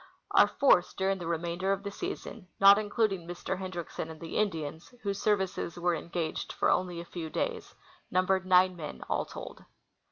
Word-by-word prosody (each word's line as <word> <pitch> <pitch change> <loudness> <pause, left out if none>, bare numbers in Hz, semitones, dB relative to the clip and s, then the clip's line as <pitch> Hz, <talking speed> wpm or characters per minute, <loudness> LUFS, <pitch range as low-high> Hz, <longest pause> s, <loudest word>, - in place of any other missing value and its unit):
Our - - +7
force 225 -10 +4
during 195 0 0
the 170 - -5
remainder 170 +3 -1
of 195 0 -1
the 200 - -4
season, 200 0 -6
not 200 +1 +8
including 205 -4 0
Mr. 175 +2 -4
Hendriksen 175 -3 -5
and 160 -1 -9
the 165 0 -7
Indians, 160 -6 -2
whose 200 -1 -2
services 190 -5 0
AA'ere 175 0 +1
engaged 170 -1 -3
for - - +2
only 180 -2 0
a 170 - -7
fcAV 165 -2 -6
days, - - -3 0.3
numbered 185 +1 +2
nine 185 0 +5
men 150 - -7
all - - 0
told. - - -9
180 Hz, 170 wpm, -30 LUFS, 170-195 Hz, 0.3 s, not